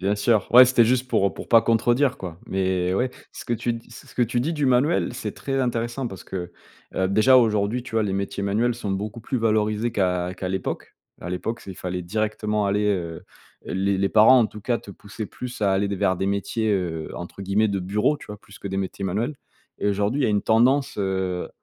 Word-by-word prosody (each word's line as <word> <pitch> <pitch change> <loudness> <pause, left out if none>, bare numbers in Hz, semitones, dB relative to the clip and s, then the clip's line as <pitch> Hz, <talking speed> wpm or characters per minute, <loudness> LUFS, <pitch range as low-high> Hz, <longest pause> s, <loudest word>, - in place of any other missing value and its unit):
Bien 100 +2 0
sûr. 105 -1 +2
Ouais, 125 +2 +10
c'était 125 -2 +4
juste 125 +2 +1
pour 100 -5 +2
pour - - -9
pas 115 -2 +6
contredire, 120 +4 +2
quoi, 90 -2 -8
mais 95 -1 0
ouais. 125 +4 0 0.2
Ce - - -9
que - - -2
tu 120 +1 -1
dis 115 - -10
ce 120 - -13
que 125 - +2
tu 120 +1 0
dis 155 +7 -1
du 150 -3 0
manuel, 130 +3 +2
c'est 110 -4 -4
très 135 -1 -2
intéressant 120 +1 -2
parce 95 - -10
que, 90 -2 -5 0.4
heu, 95 - +1
déjà, 110 +6 +5
aujourd'hui, 110 0 +2
tu - - -10
vois, 110 - +3
les 100 -2 -1
métiers 100 0 -3
manuels 110 +5 +1
sont 110 -4 -5
beaucoup 105 +4 -4
plus 125 +3 -2
valorisés 110 0 +1
qu'à 90 -3 0
qu'à 95 - -4
l'époque. 95 0 -4 0.2
À 90 - -6
l'époque, 115 +6 -3
c'est 95 - -9
il - - -7
fallait 90 0 -4
directement 105 +2 -1
aller 105 +1 +1
heu, 85 -5 -2 0.4
les 95 +1 0
les 95 0 +1
parents, 110 +4 +7
en 115 - +3
tout 105 - -11
cas, 120 +2 0
te - - -12
poussaient 105 +2 -8
plus 125 +3 -8
à 100 -1 +3
aller 100 +1 +1
vers 95 0 +1
des 95 - -1
métiers, 105 +2 0
heu, 85 -5 -2
entre 85 +2 -8
guillemets 100 +3 +1
«de 100 - -1
bureau», 105 +10 +1
tu - - -13
vois, 105 0 -8
plus 100 -1 -16
que - - -8
des 95 - -3
métiers 95 +1 -4
manuels 110 +10 -2 0.4
et - - 0
aujourd'hui, 105 +7 0
il - - +3
y - - +3
a - - +1
une 105 -1 +1
tendance, 130 +5 +3
heu 95 -2 -1
105 Hz, 235 wpm, -24 LUFS, 95-120 Hz, 0.4 s, Ouais